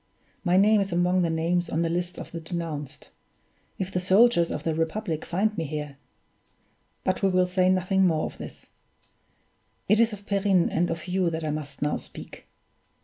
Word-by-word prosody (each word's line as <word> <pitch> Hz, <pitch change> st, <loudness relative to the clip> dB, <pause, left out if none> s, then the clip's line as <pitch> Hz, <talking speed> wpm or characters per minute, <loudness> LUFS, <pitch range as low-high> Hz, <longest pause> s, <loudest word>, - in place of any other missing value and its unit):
My 180 Hz, -1 st, +3 dB
name 210 Hz, +2 st, +5 dB
is 195 Hz, -1 st, -2 dB
among 180 Hz, +1 st, +2 dB
the 170 Hz, -, +1 dB
names 170 Hz, +2 st, 0 dB
on 165 Hz, +2 st, 0 dB
the -, -, +1 dB
list 175 Hz, +1 st, -2 dB
of -, -, -8 dB
the 170 Hz, -, -5 dB
denounced. 160 Hz, -4 st, -6 dB, 0.7 s
If 190 Hz, 0 st, -3 dB
the 180 Hz, -, 0 dB
soldiers 185 Hz, -1 st, +4 dB
of 150 Hz, -, -4 dB
the 165 Hz, -, 0 dB
Republic 165 Hz, +1 st, -2 dB
find 210 Hz, +5 st, 0 dB
me 165 Hz, -, -2 dB
here 150 Hz, -1 st, -5 dB, 1.1 s
but 185 Hz, -, 0 dB
we 195 Hz, -, +3 dB
will 185 Hz, -1 st, +3 dB
say 180 Hz, 0 st, +2 dB
nothing 185 Hz, +1 st, +3 dB
more 160 Hz, -2 st, +1 dB
of -, -, -8 dB
this; -, -, -10 dB, 1.2 s
it 210 Hz, +2 st, +4 dB
is 230 Hz, 0 st, +4 dB
of 205 Hz, -1 st, -9 dB
Perrine 195 Hz, -3 st, +2 dB
and 175 Hz, +2 st, +1 dB
of 165 Hz, +1 st, -4 dB
you 180 Hz, -1 st, +1 dB
that 160 Hz, 0 st, -4 dB
I 155 Hz, -, -1 dB
must 150 Hz, -1 st, -5 dB
now 150 Hz, -, 0 dB
speak. -, -, -11 dB
180 Hz, 190 wpm, -26 LUFS, 165-190 Hz, 1.2 s, name